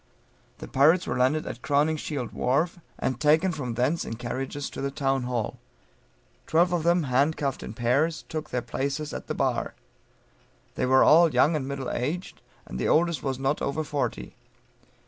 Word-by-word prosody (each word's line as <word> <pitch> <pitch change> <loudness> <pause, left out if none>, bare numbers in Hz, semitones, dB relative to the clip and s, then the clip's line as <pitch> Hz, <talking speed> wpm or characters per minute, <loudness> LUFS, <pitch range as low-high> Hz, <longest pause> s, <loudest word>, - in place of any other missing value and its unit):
The - - -8
pirates 160 +7 +4
were - - -2
landed 130 +5 +2
at - - -7
Crowningshield 145 -3 0
wharf, 155 +8 0 0.2
and 130 - -2
taken 155 +5 +3
from 130 -8 -4
thence 130 +8 +1
in 115 - -5
carriages 130 +4 -4
to - - -6
the 140 - -1
Town 135 -1 0
hall; 120 -3 -3 0.9
twelve 175 +2 +3
of 175 - +1
them, 170 +1 +3
handcuffed 140 +1 0
in 105 - -7
pairs, 140 +8 +1
took 155 -1 -5
their 125 -1 -2
places 140 +5 -3
at - - -6
the - - -3
bar. - - -1 1.0
They - - -1
were 130 +1 +6
all 165 +1 +6
young 145 +6 +3
and 135 -3 -2
middle 135 -2 -4
aged, 165 +9 -3 0.3
the 60 0 -3
oldest 170 0 +2
was 135 -2 -2
not 135 +2 -1
over 140 +3 -1
forty. 140 - -3
140 Hz, 165 wpm, -26 LUFS, 130-155 Hz, 1.0 s, were